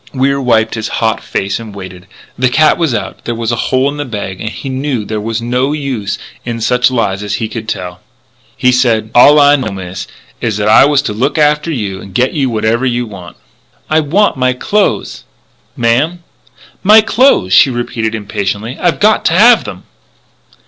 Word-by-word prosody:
Wier 140 +1 +1
wiped 110 -3 +1
his 110 -1 -3
hot 110 0 0
face 100 +1 -3
and 110 -3 -10
waited. 95 -1 -10 0.3
The 125 0 +1
cat 155 +6 +3
was 165 -5 +1
out; 120 - -5
there 120 - -3
was 115 0 -2
a - - 0
hole 130 +1 +2
in 145 +1 -3
the 145 - -2
bag; 100 -7 -6
and 110 - -3
he 135 - -8
knew 130 -4 -3
there 105 0 -4
was 115 +1 -3
no 125 +4 0
use 130 -9 -3 0.3
in 120 -1 -4
such 125 +2 +2
lies 110 -6 -1
as 105 -1 -3
he 110 - -3
could 110 -1 -7
tell. 90 0 -5 0.6
He 125 - +3
said: 115 -3 +1
"All 145 +5 +7
I 145 0 +6
know, 130 -5 -3
Miss, 95 -2 -7 0.3
is 110 -3 -1
that 105 0 -1
I 110 - +6
was 145 -1 +2
to 105 - -3
look 130 +9 -1
after 150 +2 +2
you 100 -9 -4
and 95 -1 -13
get 125 +1 +1
you 135 -4 0
whatever 115 +2 0
you 120 -1 0
want 95 -5 -11 0.3
" - - -37
"I 155 - +4
want 165 +5 +1
my 130 0 +1
clothes!" 125 - -1 0.5
"Ma'am?" 140 +10 0 0.6
"My 215 +3 +6
clothes!" 220 - +2
she 120 - +6
repeated 115 -2 -3
impatiently. 105 +2 -4
"I've 175 -2 +1
got 215 +1 +3
to - - +2
have 230 +5 +5
them!" 90 - -8
120 Hz, 195 wpm, -13 LUFS, 105-140 Hz, 0.6 s, All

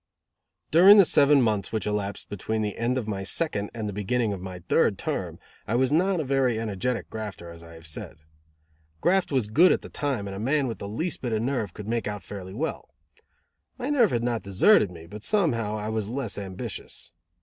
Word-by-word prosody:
During 190 +6 +8
the 200 - +8
seven 140 -3 +5
months 105 -3 0
which 110 - -2
elapsed 105 -1 -3
between 110 +2 -3
the 105 -1 -3
end 120 +2 0
of 120 -4 -3
my 100 -2 -3
second, 100 - -1
and 110 -3 -5
the 105 - -4
beginning 105 +2 0
of 95 - -6
my 95 -1 -7
third - - +3
term, - - -3 0.3
I 110 - 0
was 130 +2 +2
not 180 +4 +2
a - - 0
very 130 -4 +1
energetic 110 -2 -2
grafter, 105 -6 -6
as 85 0 -11
I 85 0 -13
have 80 0 -13
said. 80 0 -6 0.8
Graft 190 - +2
was 130 -6 +1
good 165 +13 +5
at - - 0
the - - -9
time 135 -8 -2
and 100 - -6
a - - -6
man 140 +6 +1
with 115 -3 -4
the 100 - -6
least 155 - -3
bit 120 -3 -2
of 110 0 0
nerve 120 -8 -2
could 105 -1 -8
make 115 -2 -1
out 105 -1 -5
fairly 95 -2 -8
well. 160 +7 -4 0.9
My 260 +2 -3
nerve 245 -8 +4
had 120 -4 -1
not 120 -2 -1
deserted 100 - +4
me, 85 -2 -11
but 105 +4 -10
somehow 115 - +1
I 105 +1 -4
was 110 -2 -2
less 120 -5 -3
ambitious. 95 -2 -7
110 Hz, 215 wpm, -26 LUFS, 100-135 Hz, 0.9 s, During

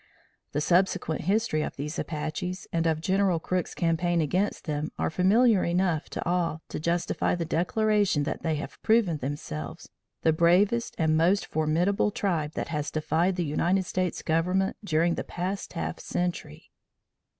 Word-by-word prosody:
The 145 - 0
subsequent 175 -1 +1
history 200 -4 +1
of - - -4
these 150 +3 -4
Apaches 155 +4 -4
and 165 0 +1
of 160 -1 0
General 190 -1 +2
Crook's 180 +1 -2
campaign 170 +1 +1
against 180 +6 0
them 150 0 -2
are - - -1
familiar 200 +4 +4
enough 175 -2 0
to - - -5
all 170 -2 0
to - - -4
justify 170 +3 0
the 170 -1 -2
declaration 205 0 +1
that - - -3
they 160 -2 0
have 150 - -7
proven 220 -8 +3
themselves 80 - -6 0.3
the 160 - +4
bravest 190 +8 +3
and 160 -1 +2
most 175 +5 +3
formidable 165 +7 +1
tribe 170 -7 -1
that - - -4
has 150 -2 -2
defied 165 +4 0
the 175 -2 -1
United 175 +5 +1
States 185 -1 -2
government 180 +4 +1
during 170 -2 +2
the - - -3
past 185 +3 -4
half 80 0 -4
century. 175 - -4
170 Hz, 155 wpm, -27 LUFS, 155-185 Hz, 0.3 s, familiar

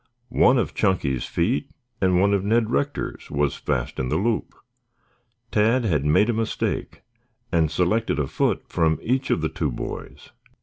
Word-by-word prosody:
One 130 - +4
of 120 - 0
Chunky's 85 - 0
feet 125 +11 -1 0.3
and 90 -2 +3
one 100 +2 +3
of 100 -2 +1
Ned 110 +2 +2
Rector's 145 +3 -2
was 70 -1 0
fast - - -2
in 65 -1 -1
the - - +1
loop. 110 +3 -1 1.0
Tad 115 +4 +3
had 75 -8 +1
made 75 +8 +4
a - - -2
mistake 110 0 -2 0.5
and 80 -2 +2
selected 90 +8 +1
a 75 - +1
foot - - -1
from 80 -3 +1
each 130 +3 0
of 80 - +1
the 80 - 0
two - - -2
boys. - - -7
100 Hz, 165 wpm, -24 LUFS, 80-115 Hz, 1.0 s, One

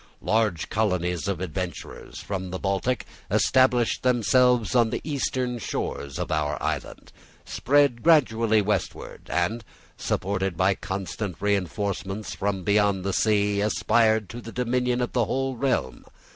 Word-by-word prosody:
Large 105 -7 0
colonies 90 -4 0
of 100 -4 -1
adventurers 90 -1 -6
from 95 -2 -4
the 95 - -4
Baltic 100 +7 -1 0.2
established 130 -3 +3
themselves 125 -1 +3
on 120 -3 +4
the - - -2
eastern 130 -4 -2
shores 70 -9 -4
of - - -3
our 75 -2 0
island, - - -4 0.3
spread 140 -3 +2
gradually 115 -9 +4
westward, 105 +1 -3
and, 90 +8 -1 0.3
supported 95 -2 -2
by 95 +2 +3
constant 95 0 -5
reinforcements 100 0 -2
from 95 -2 -2
beyond 100 -2 +2
the 100 - -1
sea, 105 -1 +2
aspired 110 0 +2
to 120 +1 -7
the 115 - -9
dominion 125 0 0
of 125 - -2
the 120 -3 +2
whole 135 +3 -1
realm. 100 - -1
105 Hz, 130 wpm, -25 LUFS, 95-120 Hz, 0.3 s, on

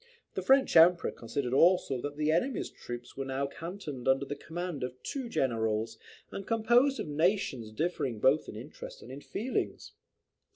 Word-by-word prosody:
The - - -2
French 270 0 +4
Emperor 170 +1 +6
considered 125 +2 -3
also 150 -4 +4
that 145 +1 -5
"the 155 0 +2
enemy's 215 +11 0
troops 120 0 -8
were 135 - -3
now 135 +1 -1
cantoned 165 -4 -6
under 135 +1 +3
the 145 - -4
command 165 -1 -5
of 125 0 -4
two 265 -4 -4
generals, 110 - 0 0.3
and 195 - -6
composed 240 +5 +3
of - - -3
nations 150 - 0
differing 135 -4 -2
both 135 +7 +3
in - - -8
interest 125 +8 -9
and 125 - -10
in 135 +2 -8
feelings." 205 - -3
145 Hz, 165 wpm, -30 LUFS, 130-180 Hz, 0.3 s, Emperor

